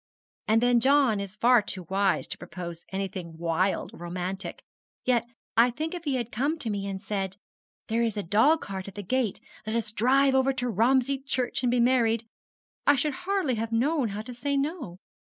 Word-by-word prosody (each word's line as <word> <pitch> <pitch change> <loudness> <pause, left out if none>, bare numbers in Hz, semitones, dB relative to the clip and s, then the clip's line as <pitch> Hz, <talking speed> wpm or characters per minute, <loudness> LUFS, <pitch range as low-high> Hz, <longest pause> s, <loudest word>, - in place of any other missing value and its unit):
And 225 +2 +3
then 245 -1 +5
John 265 -4 +4
is 200 0 -6
far 240 +2 +5
too 190 -2 -3
wise 195 +1 +1
to - - -4
propose 170 0 -8
anything 185 -4 -4
wild 170 +3 0
or - - -11
romantic 180 +3 -5 0.4
yet 240 -2 +2 0.3
I 235 +2 +6
think 310 +7 -4
if 345 -2 -6
he 280 -3 0
had 240 -2 -3
come 285 +8 0
to 230 -8 -2
me 200 -1 -3
and 195 -1 -4
said, 195 -2 -3 0.5
"There 225 +1 +1
is 225 -3 0
a 205 - -1
dog 225 - +4
cart 190 -1 -6
at 200 - -9
the 205 - -5
gate, 240 +1 0 0.3
let 220 - -1
us 230 -2 -1
drive 265 +5 +3
over 265 +1 +3
to 250 -1 -2
Romsey 255 +5 +2
Church 255 -3 -1
and 250 - +2
be 245 0 +2
married," 235 -2 +3 0.6
I 285 - +7
should 290 +2 0
hardly 360 -4 -1
have 225 0 -3
known 265 +3 +2
how 205 +2 -5
to 250 +2 -8
say 280 +4 -1
no. 275 - -3
230 Hz, 200 wpm, -27 LUFS, 195-265 Hz, 0.6 s, I